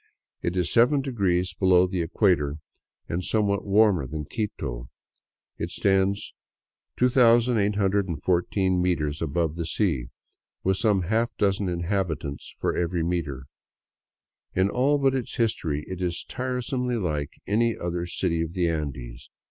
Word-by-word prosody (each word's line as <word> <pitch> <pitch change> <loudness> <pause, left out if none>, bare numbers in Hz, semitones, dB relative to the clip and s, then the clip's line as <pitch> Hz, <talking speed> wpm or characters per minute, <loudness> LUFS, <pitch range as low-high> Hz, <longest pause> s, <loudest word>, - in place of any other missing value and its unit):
It 85 +2 -2
is 90 - 0
seven 125 +5 +4
degrees 90 -9 0
below 90 0 +4
the 90 -1 -2
equator 80 -5 +1 0.5
and 85 +2 -2
somewhat 100 -1 +1
warmer 100 -8 +4
than 75 +2 -5
Quito. 70 - -4 0.7
It - - -2
stands 95 0 +1 0.6
2814 100 - +2
meters 80 -4 0
above 80 0 -1
the 85 -1 -3
sea, 80 - 0 0.6
with 95 0 +2
some 105 -3 +2
half 115 +6 0
dozen 100 -1 +1
inhabitants 85 -5 -2
for - - -1
every 85 -1 0
meter. 75 -6 -2 1.1
In 95 +2 +2
all 140 +4 +2
but 135 -1 +2
its 130 -3 -3
history 85 - -1
it 95 -1 -6
is 85 -1 -2
tiresomely 125 0 -2
like 75 -8 -2
any 115 +3 +1
other 85 0 -3
city 85 -1 -1
of 85 0 -3
the 90 -2 +1
Andes. 65 -6 -5
90 Hz, 130 wpm, -26 LUFS, 85-105 Hz, 1.1 s, seven